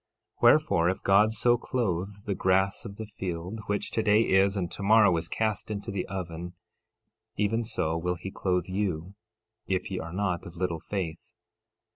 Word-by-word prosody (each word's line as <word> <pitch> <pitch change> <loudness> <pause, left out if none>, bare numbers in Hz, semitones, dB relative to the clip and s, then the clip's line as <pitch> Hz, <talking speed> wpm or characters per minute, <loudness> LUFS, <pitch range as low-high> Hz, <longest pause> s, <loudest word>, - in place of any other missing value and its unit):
13:30 - - -31
Wherefore, 85 +1 +5
if 95 - -3
God 100 +3 +5
so 120 +2 +3
clothe 100 -9 -1 0.2
the 100 - 0
grass 95 +2 +1
of 100 -3 -7
the 110 - -6
field, 95 0 -5
which 105 0 -1
today 110 -1 +3
is, 95 0 +3
and 90 -3 -2
tomorrow 105 -2 +4
is 85 0 -2
cast 110 -3 -1
into 100 -1 -4
the 100 - -3
oven, 90 -2 -5 0.8
even 110 +3 +1
so 85 -8 -1
will 90 +2 -1
he 90 +3 -7
clothe 90 -2 0
you, 95 -2 -2 0.5
if 95 0 -1
ye 95 - -2
are 85 +1 -6
not 95 -2 -1
of 85 - -11
little 85 -2 -1
faith. 85 -3 -5
95 Hz, 170 wpm, -28 LUFS, 90-105 Hz, 0.8 s, Wherefore